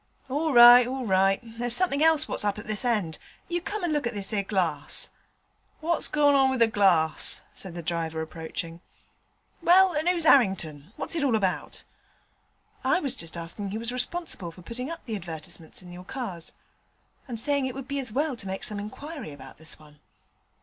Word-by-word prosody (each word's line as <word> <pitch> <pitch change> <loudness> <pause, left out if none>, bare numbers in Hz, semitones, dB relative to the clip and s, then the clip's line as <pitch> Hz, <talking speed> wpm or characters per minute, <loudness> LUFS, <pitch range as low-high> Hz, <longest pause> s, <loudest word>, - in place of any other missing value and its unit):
'All 305 +4 0
right, 240 -1 +9
all 260 0 -3
right; 195 -1 +3
there's 235 +1 0
somethink 330 -6 +1
else 315 -1 +4
what's - - -2
up 205 -1 0
at 210 - -8
this 215 +1 -3
end. 210 -10 0 0.3
You 345 0 -2
come 410 +2 -4
and 340 -3 0
look 295 -5 0
at 235 - -5
this 200 +1 -4
'ere 205 - +1
glass.' 175 -8 -1 0.7
'What's 330 +1 0
gorn 285 -3 +4
with 260 -1 -1
the 230 - +7
glass?' 185 -7 +2
said 185 -3 -9
the 170 - -6
driver, 165 -1 -2
approaching. 165 +1 -6 0.8
'Well, 365 +2 +6
and 310 +3 +1
oo's 345 -2 +1
'Arrington? 190 - +3
What's - - -3
it 320 - 0
all 260 -5 +3
about?' 195 -4 -2 1.0
'I 370 - +3
was 275 -4 -1
just 165 0 -6
asking 170 +4 -5
who 205 - -3
was 230 +2 -3
responsible 250 - -2
for 180 +2 -15
putting 245 +7 -5 0.2
the 225 - -3
advertisements 165 -3 -7
up - - -16
in 175 -1 -11
your 180 +1 -9
cars, 185 -7 -6 0.7
and 235 -3 -3
saying 280 +1 +1
it 260 - -6
would 270 -1 -7
be 280 0 -2
as 250 -5 -1
well 285 +3 0
to 195 - -7
make 190 +3 -4
some 215 -4 0
inquiry 270 - -7
about 135 -1 -12
this 160 -1 -7
one.' 150 -1 -18
225 Hz, 190 wpm, -27 LUFS, 175-275 Hz, 1.0 s, right